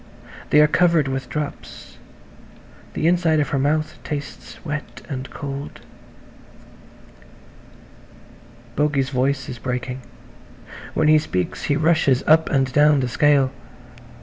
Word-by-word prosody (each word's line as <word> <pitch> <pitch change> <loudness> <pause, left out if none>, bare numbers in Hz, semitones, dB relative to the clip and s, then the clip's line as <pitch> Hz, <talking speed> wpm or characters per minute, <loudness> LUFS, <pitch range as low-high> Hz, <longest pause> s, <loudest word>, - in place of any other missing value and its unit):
They 150 - +5
are - - +7
covered 165 -2 +3
with 135 -1 -4
drops; 150 -1 -7 1.0
the - - -1
inside 170 -3 +3
of 145 - 0
her 140 - 0
mouth 155 +3 0
tastes 145 -3 -7
wet 150 -2 -6
and 130 -3 -5
cold. 140 0 -7 3.0
Bogey's 145 -3 0
voice 130 0 0
is 125 -2 -7
breaking. 125 +1 -4 0.9
When 155 - +2
he 155 0 +6
speaks 90 - -3
he 145 - +1
rushes 155 -4 +2
up 160 +1 +4
and 135 -2 +1
down 145 0 +4
the 125 - -1
scale. 140 +1 +3
145 Hz, 120 wpm, -21 LUFS, 130-155 Hz, 3.0 s, are